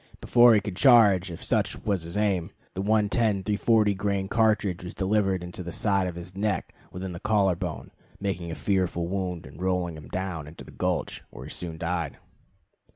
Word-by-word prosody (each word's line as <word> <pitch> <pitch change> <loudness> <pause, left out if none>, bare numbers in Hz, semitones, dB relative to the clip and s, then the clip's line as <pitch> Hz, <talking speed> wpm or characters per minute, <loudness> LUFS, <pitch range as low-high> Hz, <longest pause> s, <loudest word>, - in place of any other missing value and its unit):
Before 120 -1 +6
he 105 - +3
could 100 -2 -5
charge, 105 -8 +6
if 85 - -8
such - - +2
was 100 -4 +1
his 85 +3 -6
aim, 95 -4 +1 0.2
the 95 - -3
110 105 0 +2
340 105 0 +3
grain 100 -1 -1
cartridge 105 -5 +1
was 90 - -7
delivered 95 -2 +1
into 90 +1 -7
the 85 -1 -6
side 100 0 +1
of 90 - -5
the 90 +2 -8
neck 105 -3 -1 0.2
within 95 +1 -5
the 85 - -7
collar 100 -4 +2
bone, 90 -2 -5 0.3
making 90 -4 -3
a 80 - -4
fearful 90 -3 0
wound, 90 -2 -3
and 70 +6 -12
rolling 90 -2 0
him 75 - -10
down 90 -5 -4
into 80 - -11
the - - -13
gulch, - - -2
where - - -10
he - - -8
soon 85 -2 -5
died. 85 -3 -2
95 Hz, 190 wpm, -26 LUFS, 85-105 Hz, 0.3 s, Before